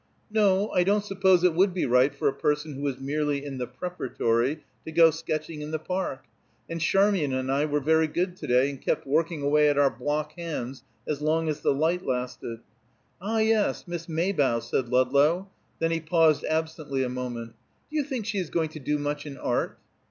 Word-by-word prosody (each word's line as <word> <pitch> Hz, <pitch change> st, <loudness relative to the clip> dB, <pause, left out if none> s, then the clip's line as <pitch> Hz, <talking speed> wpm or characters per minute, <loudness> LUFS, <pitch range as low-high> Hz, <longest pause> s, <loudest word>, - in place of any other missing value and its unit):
"No, 205 Hz, -1 st, +3 dB
I 180 Hz, -, +3 dB
don't 200 Hz, +2 st, +2 dB
suppose 190 Hz, -3 st, +3 dB
it 180 Hz, -2 st, +4 dB
would 185 Hz, +2 st, +3 dB
be 180 Hz, -, 0 dB
right 125 Hz, +3 st, +4 dB
for 140 Hz, -, -1 dB
a 135 Hz, -, +2 dB
person 150 Hz, +2 st, -1 dB
who 135 Hz, -, -7 dB
was 140 Hz, -3 st, -2 dB
merely 145 Hz, +1 st, -1 dB
in 135 Hz, -2 st, -5 dB
the 125 Hz, -, -2 dB
Preparatory 130 Hz, -2 st, -1 dB, 0.2 s
to 160 Hz, -, -7 dB
go 165 Hz, 0 st, +6 dB
sketching 155 Hz, -1 st, -4 dB
in 150 Hz, -, -5 dB
the 155 Hz, -, -1 dB
Park. 180 Hz, -4 st, -3 dB, 0.4 s
And 165 Hz, 0 st, -5 dB
Charmian 195 Hz, -5 st, +2 dB
and 130 Hz, 0 st, -1 dB
I 140 Hz, +2 st, +2 dB
were 150 Hz, -1 st, 0 dB
very 160 Hz, +2 st, +3 dB
good 175 Hz, +3 st, -1 dB
to 150 Hz, -, -7 dB
day, 125 Hz, +3 st, +3 dB
and 135 Hz, -, -10 dB
kept 160 Hz, -, -1 dB
working 155 Hz, +2 st, 0 dB
away 150 Hz, +1 st, +4 dB
at 145 Hz, -, +1 dB
our 140 Hz, -1 st, +4 dB
block 150 Hz, +5 st, -2 dB
hands 145 Hz, -7 st, -5 dB, 0.2 s
as 150 Hz, -1 st, -2 dB
long 160 Hz, +2 st, +1 dB
as 155 Hz, -2 st, -1 dB
the -, -, +2 dB
light 160 Hz, +6 st, +1 dB
lasted." 125 Hz, -2 st, -4 dB, 0.6 s
"Ah, 220 Hz, +4 st, -1 dB
yes; 220 Hz, -3 st, +1 dB
Miss 175 Hz, -1 st, -5 dB
Maybough," 155 Hz, -8 st, +1 dB
said 120 Hz, +1 st, -2 dB
Ludlow; 140 Hz, +9 st, +2 dB, 0.3 s
then 165 Hz, 0 st, 0 dB
he 165 Hz, -, 0 dB
paused 160 Hz, -1 st, +3 dB
absently 155 Hz, -4 st, -1 dB
a -, -, -1 dB
moment. 120 Hz, -2 st, -5 dB, 0.4 s
"Do 310 Hz, -, -2 dB
you 295 Hz, -, +2 dB
think 260 Hz, -6 st, -4 dB
she 205 Hz, -2 st, -1 dB
is 175 Hz, -4 st, -3 dB
going 160 Hz, -2 st, 0 dB
to 155 Hz, -, -9 dB
do 150 Hz, +2 st, -1 dB
much 145 Hz, +1 st, -3 dB
in 140 Hz, -2 st, -8 dB
art?" 125 Hz, -, -1 dB
155 Hz, 205 wpm, -26 LUFS, 135-175 Hz, 0.6 s, go